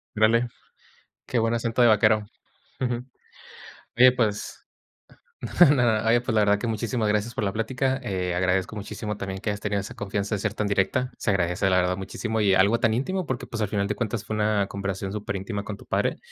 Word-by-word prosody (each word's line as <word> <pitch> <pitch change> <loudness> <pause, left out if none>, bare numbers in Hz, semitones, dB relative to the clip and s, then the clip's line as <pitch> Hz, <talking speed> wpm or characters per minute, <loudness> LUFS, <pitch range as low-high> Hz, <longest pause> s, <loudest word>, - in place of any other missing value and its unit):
Órale, 115 +3 +3 0.8
qué 120 - 0
buen 115 +1 +1
acento 115 +1 0
de 120 - +7
vaquero. 110 -1 +4 0.6
Ujú. 125 -1 -1 0.9
Oye, 125 +1 +7
pues 110 -5 -2 0.8
no, 150 -5 +5
nada. 115 -4 +2
Oye, 120 +1 +5
pues, 120 -1 -3
la 110 - +4
verdad 105 0 +3
que - - -4
muchísimas 110 0 -1
gracias 105 +2 0
por - - -1
la 100 - -1
plática. 130 +4 -1
Eh, 90 -5 -2
agradezco 95 +2 0
muchísimo 105 +1 -5
también 95 -1 -5
que 105 +1 -2
hayas 105 - -4
tenido 105 -1 -1
esa 100 - -6
confianza 100 +1 -3
de - - -4
ser 105 +2 -2
tan 105 - -1
directa. 105 +6 0
Se - - -1
agradece, 90 0 +1
la 90 - +3
verdad, 90 0 +1
muchísimo. 110 +3 -3
Y 95 -2 +4
algo 100 +5 +4
tan 110 -1 +2
íntimo 185 +7 -2
porque, 130 -2 -3
pues, 115 -1 -5
al 105 - +1
final 100 -1 -1
de 105 - -1
cuentas 115 0 -3
fue 110 - -3
una 105 -1 +1
conversación 100 -1 -4
superíntima 100 0 -4
con 100 0 -6
tu - - -15
padre. - - 0
105 Hz, 205 wpm, -25 LUFS, 100-115 Hz, 0.9 s, de